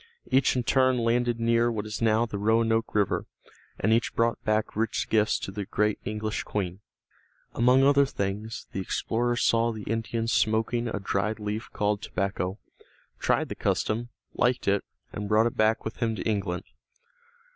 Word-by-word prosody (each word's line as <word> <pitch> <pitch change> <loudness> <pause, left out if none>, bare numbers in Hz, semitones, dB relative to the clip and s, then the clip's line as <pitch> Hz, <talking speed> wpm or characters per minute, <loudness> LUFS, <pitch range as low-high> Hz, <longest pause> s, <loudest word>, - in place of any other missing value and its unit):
Each 130 0 +3
in 125 - 0
turn 130 +1 +3
landed 120 0 +1
near 115 +1 +2
what 105 -2 -3
is 110 +1 -5
now 110 +1 +3
the 105 -3 -5
Roanoke 115 +1 +1
River, 100 -2 +1 0.5
and 110 +3 +2
each 115 +1 +1
brought 115 0 +1
back 110 0 0
rich 110 +2 -1
gifts 110 -1 +3
to - - -6
the 100 +1 -4
great 105 +2 0
English 110 0 -3
Queen. 95 -3 -3 0.7
Among 125 +3 +4
other 140 0 +5
things 105 0 -4
the - - -4
explorer 120 +5 -1
saw 115 0 +2
the 110 -2 -7
Indians 115 +1 -2
smoking 115 +2 +1
a 110 - -3
dried 100 +2 -1
leaf 105 +1 -4
called 105 0 0
tobacco, 95 -1 -2 0.6
tried - - +1
the - - -3
custom, 115 +2 -1 0.2
liked 125 0 +1
it, 100 0 +2 0.3
and 105 0 -4
brought 110 +1 +4
it 120 - -1
back 110 +1 +2
with 110 - -5
him 115 -1 0
to 100 - -4
England. 95 -4 -1
110 Hz, 165 wpm, -27 LUFS, 105-115 Hz, 0.7 s, other